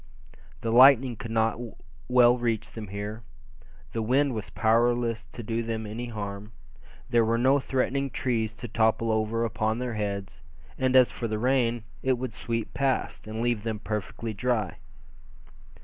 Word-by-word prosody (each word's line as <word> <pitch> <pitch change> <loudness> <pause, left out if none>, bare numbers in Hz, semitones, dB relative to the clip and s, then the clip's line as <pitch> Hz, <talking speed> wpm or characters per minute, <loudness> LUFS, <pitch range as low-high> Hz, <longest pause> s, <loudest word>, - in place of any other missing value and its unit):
The 115 - -1
lightning 130 0 +7
could 115 +1 -7
not 110 0 +1 0.5
well 125 -1 +6
reach 115 -3 -1
them 110 -2 -7
here, 105 +3 -5 0.7
the 115 - -2
wind 130 +4 +2
was 110 -3 -5
powerless 115 0 +1
to 120 - -9
do 115 +2 -1
them 115 -1 -3
any 115 +4 -5
harm; 105 -1 -6 0.6
there 120 -1 +5
were 115 +1 +1
no 130 +4 +4
threatening 135 +1 -1
trees 115 -4 -1
to 120 - -7
topple 110 0 +1
over 110 +1 0
upon 110 0 -1
their 125 -1 -3
heads; 100 -6 -4 0.3
and 130 0 +1
as 130 -1 +6
for 115 - -4
the 110 -1 -2
rain, 120 -1 +1 0.2
it 130 - +2
would 125 -2 -4
sweep 115 0 -3
past, 135 -5 -1
and 110 +2 -3
leave 120 -3 +1
them 110 0 -3
perfectly 105 +1 -4
dry. 110 -2 -1
115 Hz, 160 wpm, -27 LUFS, 110-120 Hz, 0.7 s, lightning